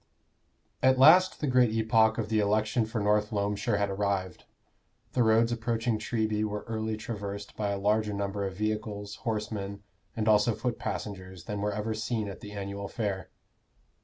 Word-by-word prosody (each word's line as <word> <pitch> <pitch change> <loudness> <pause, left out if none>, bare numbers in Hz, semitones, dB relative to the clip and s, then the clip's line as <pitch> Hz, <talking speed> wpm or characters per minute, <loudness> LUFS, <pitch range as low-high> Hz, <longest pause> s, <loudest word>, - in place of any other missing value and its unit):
At 130 0 +5
last 175 +8 +6
the - - +1
great 125 -3 +4
epoch 110 0 +3
of 110 -2 -2
the 110 -1 +2
election 110 +2 +1
for 115 0 -3
North 105 0 +2
Loamshire 100 0 0
had 100 -1 0
arrived. 95 -2 -2 0.7
The 125 - +1
roads 115 +1 +4
approaching 115 -1 -1
Treby 110 -1 -1
were 105 -1 -3
early 110 -1 -2
traversed 100 -2 -6
by 105 -1 -1
a 100 - -1
larger 105 +2 +1
number 100 0 -2
of 95 -1 -8
vehicles, 105 -1 -3
horsemen, 105 -4 -4 0.3
and 110 -1 -1
also 105 +1 +4
foot 125 -2 -3
passengers 95 -3 -5
than 105 +2 -4
were 105 0 0
ever 105 +1 -2
seen 110 0 -2
at 100 -3 -7
the 105 0 -9
annual 100 0 -5
fair. 100 -3 -3
105 Hz, 165 wpm, -29 LUFS, 100-110 Hz, 0.7 s, last